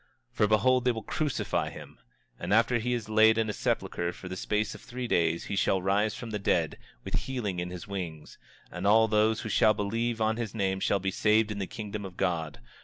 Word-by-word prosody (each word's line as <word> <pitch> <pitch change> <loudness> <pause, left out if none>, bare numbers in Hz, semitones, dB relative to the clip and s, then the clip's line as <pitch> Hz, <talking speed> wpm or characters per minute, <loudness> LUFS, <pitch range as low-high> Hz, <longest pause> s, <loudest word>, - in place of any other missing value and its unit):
25:13 105 - +3
Behold, 125 +4 +3
they 125 - +4
will 110 -2 -5
crucify 150 +3 -1
him; - - -12 0.4
and - - -4
after 115 +1 +3
he 125 +2 -2
is 120 -3 -2
laid 110 +1 +5
in 110 -1 +1
a - - -6
sepulchre 85 -3 -1
for 90 - -10
the 90 - -5
space 105 +3 -1
of - - -11
three 125 0 -5
days 85 -4 +1
he - - -4
shall 95 -1 +2
rise 100 +3 +1
from 115 -2 -7
the 105 - -2
dead, 100 - 0 0.2
with - - -7
healing 110 -9 -2
in 90 0 -3
his 90 -1 -8
wings; 85 -6 -6 0.3
and 90 +3 -3
all 110 +2 +6
those 110 +1 +2
who 110 - -5
shall 110 0 +4
believe 115 +3 -1
on 110 0 +1
his 115 -2 -4
name 95 -2 0
shall 100 - +1
be 95 0 -1
saved 110 +2 +2
in 105 - -4
the 95 - -2
kingdom 105 -2 -6
of 95 -2 -9
God. 80 -4 -1
105 Hz, 225 wpm, -29 LUFS, 95-110 Hz, 0.4 s, all